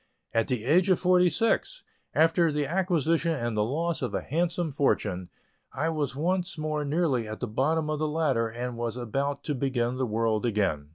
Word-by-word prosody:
At 115 -1 +2
the 125 -4 -1
age 175 +8 +4
of 185 - +4
forty 180 -1 +4
six, 230 - 0 0.3
after 165 +1 +4
the 150 0 0
acquisition 165 -1 +1
and 120 -6 -2
the 105 - +2
loss 160 +8 -1
of 125 - -2
a - - -1
handsome 170 +2 -1
fortune, 105 -10 0 0.4
I 155 +5 0
was 150 -5 -2
once 180 +4 -1
more 155 -1 -2
nearly 145 -6 0
at 110 0 -6
the - - -2
bottom 150 +8 0
of 155 -1 -2
the 155 - 0
ladder, 150 -7 +1
and 120 +1 -5
was 120 0 -2
about 140 +4 -2
to 150 - -2
begin 125 -2 -1
the 130 -1 0
world 110 0 0
again. 100 -11 0
145 Hz, 190 wpm, -27 LUFS, 120-165 Hz, 0.4 s, age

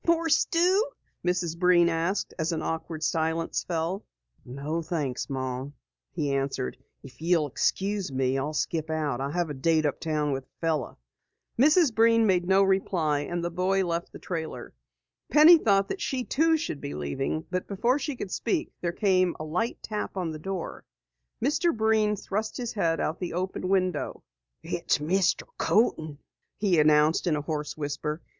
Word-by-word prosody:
"More 335 -1 +3
stew?" 360 +8 +3 0.3
Mrs. 175 -2 -1
Breen 180 -1 +5
asked 170 +4 -1
as 160 +2 0
an 160 -1 -2
awkward 160 -1 -4
silence 160 +1 0
fell. 175 +4 -2 0.4
"No 140 +6 -4
thanks, 150 -7 -3
Mom," 130 +1 -4 0.4
he 145 -5 -1
answered. 135 - -2 0.3
"If 135 +2 -14
you'll 165 -2 +2
excuse 195 +5 -1
me, 130 0 0
I'll 145 +3 -2
skip 160 +1 -1
out. 150 -5 -1
I 140 - -2
have 170 0 -1
a - - -3
date 155 +3 +2
uptown 150 0 -1
with 135 -1 -3
a - - -49
fellow." 160 -6 -1 0.6
Mrs. 300 0 +5
Breen 230 +1 +4
made 180 -3 +2
no 195 +1 +5
reply 180 -6 +1
and 170 +4 -3
the 175 - -2
boy 185 +2 +1
left 170 0 -3
the - - -9
trailer. 160 -3 -5 0.6
Penny 315 +3 +8
thought 200 -6 +3
that 390 - -4
she 260 -3 -1
too 320 +5 +2
should 160 - -4
be 70 - -5
leaving, 135 - -3
but 180 0 -2
before 235 +7 +1
she 285 0 -3
could 200 -6 -6
speak, 345 -5 -1
there 170 - 0
came 185 -2 +2
a - - -4
light 180 +10 -2
tap 210 -2 -4
on 175 -3 -1
the 155 - -7
door. 190 +1 -5 0.6
Mr. 305 +2 +1
Breen 220 -1 +2
thrust 210 +2 -3
his 240 -2 -4
head 165 -6 +1
out 160 - -2
the 180 - -4
open 185 +1 -3
window. 185 -5 0 0.4
"It's - - 0
Mr. 175 +5 +1 0.2
Coaten," 160 -9 +1 0.4
he 190 -6 +2
announced 150 +3 +4
in 160 - +2
a 150 - -2
hoarse 150 0 -4
whisper. 150 +2 -3
170 Hz, 170 wpm, -27 LUFS, 150-200 Hz, 0.6 s, Penny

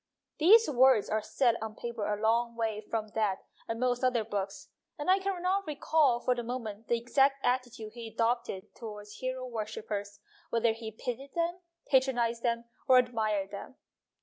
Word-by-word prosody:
These 435 +9 +7
words 260 -5 +4
are 215 0 +1
set 235 +1 +1
on 220 -1 -5
paper 235 -3 -4
a 210 - -1
long 230 +2 +1
way 220 -2 -1
from 220 -2 -2
that 210 -3 -1 0.2
and 225 0 -3
most 250 0 +1
other 250 -3 +2
books, 200 -2 -4 0.3
and 295 +4 +1
I 385 - +5
can 385 -1 -2
not 385 +1 +1
recall 295 -4 +2
for 250 - +2
the 245 - -3
moment 230 -3 -5
the 235 - +2
exact 270 +3 +2
attitude 245 -3 -1
he 235 -1 -7
adopted 230 -3 -1
towards 210 -2 -9
hero 255 0 -3
worshippers 215 -3 -5 0.3
whether 230 0 +2
he 225 0 -7
pitied 250 +4 -6
them, 340 +1 0 0.3
patronized 245 -3 +2
them, 235 -1 0 0.2
or 255 - +7
admired 215 -5 +1
them. 200 +5 -8
235 Hz, 170 wpm, -30 LUFS, 220-255 Hz, 0.3 s, These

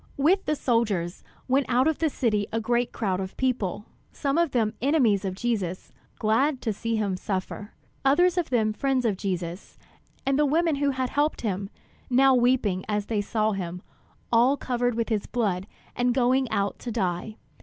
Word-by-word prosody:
With 340 +8 +3
the 305 - +1
soldiers, 210 - 0 0.2
went 270 +1 +2
out 255 +3 +3
of 315 - 0
the 320 - +2
city 215 -7 0
a 225 - 0
great 240 +2 0
crowd 190 -5 -1
of 190 -1 -6
people; 230 -6 -1 0.3
some 275 -2 -1
of 340 -1 +3
them 225 -5 0
enemies 245 -8 +3
of 190 -2 -3
Jesus, 195 -5 -2 0.3
glad 255 +6 +2
to 220 - 0
see 230 +3 -2
him 205 -3 0
suffer; 195 +2 -4 0.3
others 345 +6 +4
of 355 -3 -1
them 220 -4 +1
friends 265 +1 0
of 215 -4 +2
Jesus, 180 -2 -4 0.5
and 275 +1 +2
the 300 - +4
women 320 +1 +2
who 285 0 +1
had 260 -2 -2
helped 295 +2 0
him, 195 -3 -2 0.4
now 265 +1 +5
weeping 240 -7 +2
as 210 -1 0
they 215 -2 -1
saw 215 +1 0
him, 180 -2 -5 0.5
all 245 +4 +4
covered 245 -2 -1
with 230 0 -1
his 215 -3 -1
blood 200 -6 -1 0.3
and 245 0 +1
going 255 0 +2
out 200 -2 -1
to 240 - -5
die. 190 0 -2
235 Hz, 180 wpm, -26 LUFS, 205-265 Hz, 0.5 s, now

